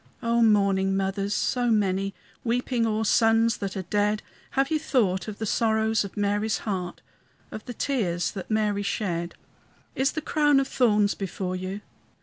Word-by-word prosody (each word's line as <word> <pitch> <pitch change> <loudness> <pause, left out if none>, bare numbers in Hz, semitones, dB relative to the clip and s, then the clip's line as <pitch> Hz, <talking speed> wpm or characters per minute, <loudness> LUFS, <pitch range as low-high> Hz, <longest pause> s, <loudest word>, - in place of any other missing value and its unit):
O 235 0 +2
mourning 195 -3 +3
mothers, 195 +1 -1
so 245 -1 0
many, 195 -3 +1 0.3
Weeping 240 0 0
o'er 220 0 0
sons 225 0 +3
that 195 0 -4
are 190 - -3
dead, 210 +3 0 0.3
Have 275 +3 +2
ye 310 - +2
thought 195 - 0
of 210 -1 -6
the 220 - -3
sorrows 220 0 +1
of 200 - -9
Mary's 205 +1 0
heart, 185 -4 -4 0.5
Of 215 - -8
the 245 - -7
tears 180 -12 -1
that 195 - -7
Mary 210 -2 +1
shed? 180 -4 -2 0.6
Is 270 +2 +1
the 310 - -3
crown 295 -2 +3
of 270 - 0
thorns 210 -5 +2
before 185 -1 -4
you? 185 +2 -5
210 Hz, 160 wpm, -26 LUFS, 195-230 Hz, 0.6 s, mourning